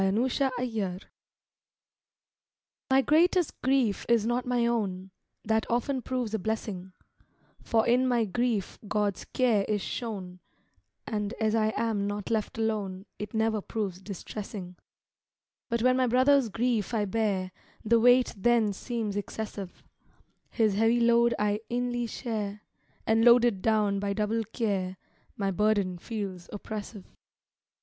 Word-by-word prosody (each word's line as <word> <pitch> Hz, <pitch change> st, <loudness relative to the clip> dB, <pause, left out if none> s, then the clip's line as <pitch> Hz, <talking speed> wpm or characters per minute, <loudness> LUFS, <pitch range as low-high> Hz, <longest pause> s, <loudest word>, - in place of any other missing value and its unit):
OTHERS' 230 Hz, +8 st, +1 dB, 0.2 s
BURDENS 215 Hz, -7 st, -3 dB, 1.9 s
My 265 Hz, 0 st, +5 dB
greatest 345 Hz, +3 st, +2 dB
grief 260 Hz, -6 st, +2 dB
is 230 Hz, -3 st, +4 dB
not 240 Hz, +2 st, -1 dB
my 245 Hz, -1 st, +2 dB
own; 195 Hz, -5 st, -1 dB, 0.3 s
That 220 Hz, 0 st, 0 dB
often 255 Hz, +3 st, 0 dB
proves 245 Hz, -3 st, -3 dB
a 220 Hz, -, 0 dB
blessing, 190 Hz, -3 st, -4 dB, 0.7 s
For 225 Hz, -1 st, +1 dB
in 250 Hz, +2 st, +3 dB
my 240 Hz, -3 st, +2 dB
grief 220 Hz, 0 st, -1 dB
God's 205 Hz, -2 st, -1 dB
care 235 Hz, -6 st, +2 dB
is 210 Hz, -1 st, +1 dB
shown, 195 Hz, -7 st, -5 dB, 0.7 s
And 210 Hz, 0 st, -2 dB
as 220 Hz, -1 st, +1 dB
I 220 Hz, -1 st, +2 dB
am 215 Hz, -3 st, 0 dB
not 205 Hz, +1 st, -4 dB
left 220 Hz, -1 st, -1 dB
alone, 205 Hz, -4 st, -2 dB
It 210 Hz, +2 st, -6 dB
never 220 Hz, -1 st, +1 dB
proves 195 Hz, -4 st, -4 dB
distressing; 195 Hz, -1 st, -7 dB, 0.9 s
But 235 Hz, 0 st, 0 dB
when 255 Hz, 0 st, +4 dB
my 255 Hz, -1 st, +3 dB
brother's 255 Hz, +1 st, +4 dB
grief 230 Hz, 0 st, 0 dB
I 210 Hz, -2 st, +1 dB
bear 195 Hz, -3 st, -1 dB, 0.3 s
The 230 Hz, +2 st, +4 dB
weight 245 Hz, +2 st, +5 dB
then 220 Hz, 0 st, +2 dB
seems 220 Hz, 0 st, -3 dB
excessive; 205 Hz, -2 st, -6 dB, 0.7 s
His 220 Hz, -4 st, +2 dB
heavy 225 Hz, +4 st, +3 dB
load 235 Hz, 0 st, +4 dB
I 210 Hz, 0 st, 0 dB
inly 240 Hz, 0 st, -1 dB
share, 210 Hz, -4 st, -4 dB, 0.4 s
And 225 Hz, +1 st, +3 dB
loaded 240 Hz, -4 st, +5 dB
down 210 Hz, -2 st, +2 dB
by 200 Hz, 0 st, -1 dB
double 220 Hz, +2 st, -1 dB
care, 195 Hz, -4 st, -2 dB, 0.4 s
My 195 Hz, -1 st, 0 dB
burden 200 Hz, -2 st, +1 dB
feels 195 Hz, -5 st, -5 dB
oppressive. 205 Hz, -1 st, -7 dB
220 Hz, 130 wpm, -28 LUFS, 200-235 Hz, 1.9 s, My